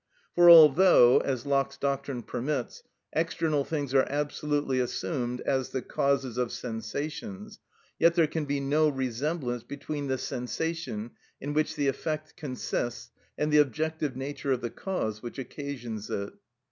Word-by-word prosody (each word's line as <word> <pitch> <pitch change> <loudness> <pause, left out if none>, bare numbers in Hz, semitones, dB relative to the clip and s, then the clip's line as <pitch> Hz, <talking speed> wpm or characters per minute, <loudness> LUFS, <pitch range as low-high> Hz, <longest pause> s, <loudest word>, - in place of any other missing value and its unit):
For 175 0 +7
although, 160 -5 +8
as 130 -2 -2
Locke's 140 -1 0
doctrine 140 -3 -2
permits, 130 +2 -3 0.3
external 160 -2 0
things 145 -3 -3
are 135 -1 +4
absolutely 145 -1 -1
assumed 125 -1 -2
as 130 -2 0
the 130 - -3
causes 135 -3 0
of 125 -2 0
sensations, 155 - -5 0.4
yet 170 +1 +5
there 170 -2 +5
can 155 0 -3
be 140 0 -1
no 150 +3 +2
resemblance 130 0 -2
between 145 +2 -5
the 130 -1 0
sensation 125 -2 -4 0.3
in 145 +2 -4
which 155 +1 0
the 145 -2 0
effect 155 +3 -3
consists 125 -6 -4 0.3
and 150 0 0
the 150 - +7
objective 150 0 0
nature 135 +1 -3
of 130 -2 +1
the 120 -1 -3
cause 110 - -3
which 120 +2 -7
occasions 125 -5 -6
it. 100 0 -3
140 Hz, 145 wpm, -28 LUFS, 125-155 Hz, 0.4 s, although